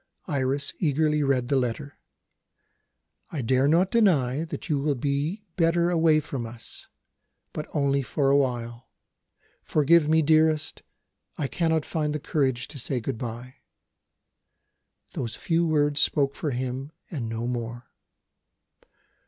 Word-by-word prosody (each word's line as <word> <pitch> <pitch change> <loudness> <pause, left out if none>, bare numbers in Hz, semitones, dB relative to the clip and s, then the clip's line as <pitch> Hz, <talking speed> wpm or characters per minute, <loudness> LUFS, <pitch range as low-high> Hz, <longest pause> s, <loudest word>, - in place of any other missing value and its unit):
Iris 140 -2 -1
eagerly 150 -1 +1
read 135 -3 +1
the 140 - +1
letter: 135 +3 -2 1.3
"I 145 -6 -4
dare 130 +3 +2
not 175 +5 +3
deny 160 - +2
that 155 -4 -7
you 150 -4 +1
will 145 0 0
be 145 - -2
better 170 0 +2
away 160 -2 +4
from 135 -4 -5
us, 115 0 -11 0.7
but 150 - -5
only 140 -1 +2
for 135 +2 0
a - - +5
while. 120 -3 -1 0.7
Forgive 155 +1 +3
me, 160 0 +4
dearest; 155 0 +2 0.6
I 150 - -1
cannot 160 +1 0
find 150 -2 -2
the - - -2
courage 130 -5 -1
to 145 - -7
say 130 +1 -1
good 120 0 -4
bye." 120 +2 -7 1.6
Those 115 -3 -3
few 170 0 0
words 145 -2 +2
spoke 140 -2 +3
for 155 - -3
him 130 +2 -4 0.2
and 125 -9 -4
no 115 +1 -3
more. 120 0 -5
140 Hz, 135 wpm, -26 LUFS, 130-155 Hz, 1.6 s, a